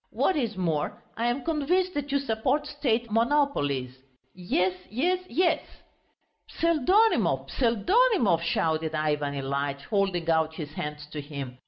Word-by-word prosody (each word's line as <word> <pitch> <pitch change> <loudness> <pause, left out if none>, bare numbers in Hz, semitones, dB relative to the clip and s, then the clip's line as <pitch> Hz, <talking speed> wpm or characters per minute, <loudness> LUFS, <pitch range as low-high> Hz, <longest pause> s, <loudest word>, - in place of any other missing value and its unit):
What 380 - +1
is 230 -8 -2
more, 165 -5 -1 0.2
I 230 +1 -1
am 245 +2 -1
convinced 350 +4 0
that 290 -2 -3
you 280 - +3
support 275 +3 0
State 245 -6 -1
monopolies.... 210 - +1 0.3
Yes, 180 0 0 0.2
yes, 340 - +1
yes!" 350 0 +2 0.9
"Pseldonimov, 335 - +2
Pseldonimov," 240 - +3
shouted 160 -1 0
Ivan 150 -2 -1
Ilyitch, 140 +1 -2
holding 195 -5 0
out 160 -1 +1
his 150 -3 -7
hands 150 -1 -5
to 150 - -5
him. 140 -4 -7
205 Hz, 130 wpm, -27 LUFS, -, 0.9 s, you